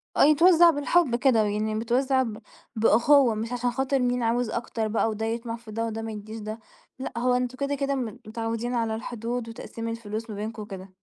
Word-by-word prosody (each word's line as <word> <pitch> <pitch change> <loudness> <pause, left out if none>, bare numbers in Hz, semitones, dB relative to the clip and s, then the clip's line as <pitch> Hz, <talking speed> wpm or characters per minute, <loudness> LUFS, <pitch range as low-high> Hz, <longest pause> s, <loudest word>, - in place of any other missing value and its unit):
آه - - +5
يتوزّع 335 +3 +7
بالحب 290 -3 +2
كده. 240 -3 +3
ويعني 215 +1 -1
متوزّع 260 +4 +1
ب 220 -3 -5 0.4
بأُخُوّة، 235 +3 +5
مش 225 +3 -4
عشان 245 0 0
خاطر 265 +2 0
مين 245 -1 +1
عاوز 235 +1 +1
أكتر 230 -1 -2
بقى 225 +1 +1
وده 220 +1 -3
يطمع 230 +1 -3
في 230 -1 -12
ده 225 +2 -2
وده 225 0 -4
ما 225 - -5
يدّيش 215 +1 -7
ده. 215 +1 -6 0.4
لأ 265 - -5
هو 250 +1 +2
أنتم 250 0 -1
كده، 280 +1 -1
كده 275 0 -1
م 255 - -1 0.2
متعوّدين 230 +2 -3
على 225 -2 0
الحدود 235 0 -4
وتقسيم 230 0 -7
الفلوس 225 0 -5
ما 210 - -5
بينكم 215 +2 -5
وكده. 195 -2 -8
230 Hz, 200 wpm, -26 LUFS, 220-250 Hz, 0.4 s, يتوزّع